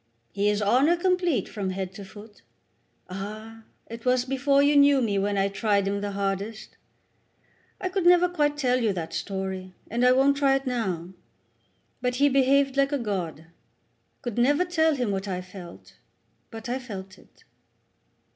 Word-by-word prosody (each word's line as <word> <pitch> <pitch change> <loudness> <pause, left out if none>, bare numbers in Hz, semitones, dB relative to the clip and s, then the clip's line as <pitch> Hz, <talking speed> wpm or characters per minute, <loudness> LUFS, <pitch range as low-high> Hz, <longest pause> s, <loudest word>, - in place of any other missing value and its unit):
He 205 +1 +1
is 210 0 0
honour 265 +11 +3
complete 355 - +1
from 200 -3 -4
head 190 0 -4
to 200 - -9
foot. 205 +2 -14 0.7
Ah, 215 +4 -8 0.2
it 230 0 -9
was 250 0 +2
before 275 +2 +2
you 290 +1 +3
knew 285 -1 +6
me 210 -5 0
when 200 +1 -1
I 195 0 +2
tried 200 0 0
him 200 0 -1
the 205 -1 -4
hardest. 200 +2 -4 1.0
I 370 - -2
never 360 -1 +4
could 355 - -13
quite 295 -2 +1
tell 255 -3 +1
you 220 -4 +1
that 170 -3 -5
story, 190 -1 -4 0.2
and 235 +2 0
I 250 - +6
won't 275 +2 +3
try 275 -1 +3
it 270 0 -2
now; 190 -9 -2 0.9
but 250 0 -1
he 285 +3 +4
behaved 275 0 +3
like 275 +1 +3
a 285 - +1
god. 190 - -3
I - - -19 0.8
could 240 -2 -3
never 290 +8 +3
tell 320 -3 +2
him 245 -6 -1
what 195 +1 -3
I 185 -2 -2
felt, 180 -1 -12 0.5
but 225 0 -8
I 250 +2 -2
felt 195 -6 -9
it." - - -24
230 Hz, 175 wpm, -26 LUFS, 195-275 Hz, 1.0 s, knew